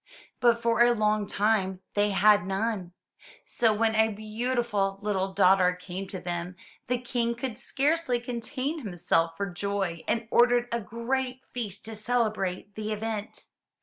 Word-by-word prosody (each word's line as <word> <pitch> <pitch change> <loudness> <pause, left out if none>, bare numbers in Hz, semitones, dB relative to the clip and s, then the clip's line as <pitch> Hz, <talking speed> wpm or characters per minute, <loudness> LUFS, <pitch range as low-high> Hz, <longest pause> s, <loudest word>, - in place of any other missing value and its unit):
but 235 -1 +4
for 235 0 +2
a 240 0 +6
long 210 -1 +1
time 195 -3 +1
they 205 0 +2
had 205 +1 +5
none. 195 -2 -2 0.5
So, 230 -2 +2
when 220 +1 +2
a 220 0 +3
beautiful 215 -2 -1
little 195 -2 0
daughter 185 -1 +4
came 185 +1 -6
to 190 - -6
them, 175 0 -4 0.3
the 250 - +1
King 240 -1 -1
could 235 -1 -4
scarcely 280 +1 0
contain 255 +5 -3
himself 175 - 0
for 200 - -1
joy 195 -3 -2
and 230 -1 0
ordered 245 0 +4
a 235 0 -1
great 250 +5 -3
feast 210 -5 -5
to 225 - -6
celebrate 215 -4 -1
the 215 +1 -4
event. 215 0 -4
215 Hz, 150 wpm, -28 LUFS, 195-240 Hz, 0.5 s, a